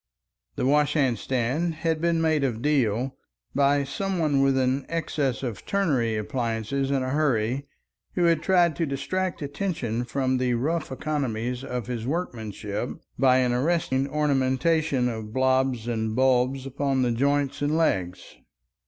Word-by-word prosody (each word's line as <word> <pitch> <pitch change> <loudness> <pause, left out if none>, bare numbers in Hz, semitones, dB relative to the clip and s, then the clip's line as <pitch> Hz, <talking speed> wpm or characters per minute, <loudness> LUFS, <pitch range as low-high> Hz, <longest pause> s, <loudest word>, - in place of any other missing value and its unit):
This - - -1
washhandstand 140 +1 +1
had 160 0 -1
been 170 -1 +2
made 155 -3 +2
of 120 -5 -1
deal 130 -3 +1 0.4
by 140 +1 +3
some 195 +7 -3
one 150 -5 +2
with 135 -1 +3
an 130 +1 0
excess 145 -6 -1
of 120 -6 -4
turnery 135 - +1
appliances 115 +4 -2
in 135 -2 +1
a 130 - -2
hurry, 135 -2 0 0.5
who 180 - +2
had 165 -2 +3
tried 175 -2 +3
to 165 - 0
distract 175 +6 -2
attention 140 - -2
from 130 0 0
the 125 -1 +1
rough 155 +6 -1
economies 125 -4 -2
of 125 -4 -4
his 120 -2 -4
workmanship 110 - -3 0.3
by 130 -1 +5
an 125 -1 +1
arresting 135 -1 +1
ornamentation 140 -1 +1
of 110 -2 -5
blobs 130 -2 +1
and 110 -2 -1
bulbs 130 +1 +2
upon 135 0 0
the 120 - +1
joints 140 +3 0
and 145 +2 +1
legs. 95 - -1
135 Hz, 145 wpm, -25 LUFS, 125-150 Hz, 0.5 s, by